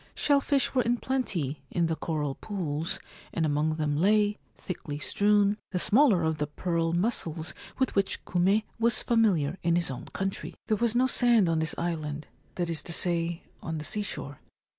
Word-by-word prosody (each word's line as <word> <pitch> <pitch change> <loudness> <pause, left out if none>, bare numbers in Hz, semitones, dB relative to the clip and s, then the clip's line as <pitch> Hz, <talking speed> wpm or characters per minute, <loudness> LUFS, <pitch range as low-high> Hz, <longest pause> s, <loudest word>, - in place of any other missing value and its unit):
Shell 285 -1 +3
fish 275 -1 +1
were 255 - +3
in 240 0 +1
plenty 185 - -2
in 170 - +1
the 165 0 0
coral 150 -4 -2
pools, 165 -4 -3 0.3
and 165 - 0
among 155 +1 +1
them 150 -2 0
lay, 205 +5 +3 0.2
thickly 165 -5 -5
strewn, 205 +5 +2
the 185 - -2
smaller 210 - +4
of 160 -1 0
the 150 - 0
pearl 165 +2 -1
mussels 170 -4 -1 0.2
with 260 -2 +1
which 195 -1 0
Kume 190 +4 +2 0.2
was 230 0 +2
familiar 190 -9 +2
in 170 0 +2
his 170 -5 0
own 125 -1 -6
country. 195 0 -4
There 215 - +1
was 235 +1 +1
no 250 +1 +4
sand 240 -6 +4
on 165 -1 +1
this 160 0 -2
island 155 -3 -3 0.2
— - - -35
that 175 -1 -1
is 165 -2 -2
to - - -2
say, 170 -1 0 0.2
on 160 -1 -4
the 155 - -5
seashore. 190 -10 -4
175 Hz, 185 wpm, -28 LUFS, 160-210 Hz, 0.3 s, smaller